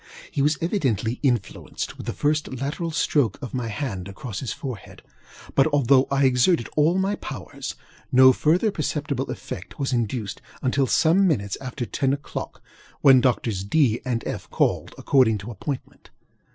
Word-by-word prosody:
He 140 - -1
was 150 +2 +2
evidently 130 - 0
influenced 120 -8 -2
with - - -9
the - - -1
first 150 -3 -1
lateral 150 +5 -3
stroke 145 -7 +1
of 135 -3 -7
my 125 -3 -2
hand 105 -6 -4
across 100 +2 -6
his 130 - -4
forehead; 130 - -7 0.5
but 135 - +4
although 140 -3 +4
I 140 0 +2
exerted 125 +2 +3
all 155 +4 +3
my 190 +2 +1
powers, - - -7 0.4
no 130 0 +8
further 175 - +2
perceptible 145 -5 -2
effect - - -7
was 135 -2 -1
induced 115 -3 -2 0.2
until 130 +1 +2
some 175 +9 +4
minutes 100 - 0
after 130 -1 -4
ten 135 +3 0
oŌĆÖclock, 145 - -6 0.5
when 135 -2 +7
Doctors 115 -6 0
DŌĆöŌĆö 120 +1 +2
and 120 -2 -1
FŌĆöŌĆö - - -5
called, - - 0
according 125 -6 +3
to 105 +4 -7
appointment. 135 +4 -6
135 Hz, 155 wpm, -24 LUFS, 120-150 Hz, 0.5 s, no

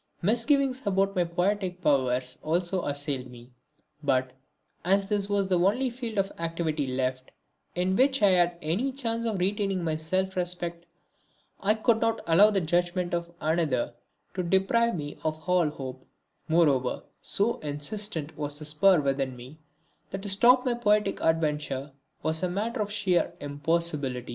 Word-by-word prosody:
Misgivings 255 - +2
about 195 0 +1
my 180 -1 +2
poetic 180 +1 -1
powers 130 -5 +1
also 175 +3 -1
assailed 145 -2 -2
me; 120 0 -14 0.5
but, 130 -3 +1 0.5
as 195 +2 +3
this 200 0 -1
was 200 -1 +1
the 180 -2 +2
only 235 +8 +2
field 235 -3 -6
of 195 0 +1
activity 165 -3 -2
left 130 0 -2 0.5
in 180 +1 +1
which 270 +1 +3
I 200 - +7
had 175 -2 +3
any 195 - 0
chance 230 -3 -2
of 215 -3 -1
retaining 195 0 0
my 160 -2 0
self 185 +5 -1
respect, 175 -1 -3 0.7
I 210 +2 +2
could 225 +1 +2
not 225 0 +1
allow 180 +6 +6
the 200 -3 +1
judgment 175 +2 0
of 170 0 -2
another 155 -6 0 0.4
to 185 - -2
deprive 195 +6 +2
me 145 -3 -6
of 155 +1 -3
all 180 -3 +3
hope; 130 -3 -8 0.4
moreover, 145 -6 +2 0.2
so 215 +4 +1
insistent 155 +2 -3
was 145 -1 -4
the 150 - -8
spur 155 +3 +4
within 135 -2 -1
me 130 +6 -12 0.5
that 195 0 -6
to 205 - -3
stop 245 +6 +5
my 250 - +2
poetic 210 -3 +1
adventure 150 -4 0 0.3
was 160 +1 0
a 185 - 0
matter 215 +5 -2
of 205 -1 -2
sheer 195 -4 +1
impossibility. 145 -3 -1
175 Hz, 155 wpm, -27 LUFS, 150-200 Hz, 0.7 s, I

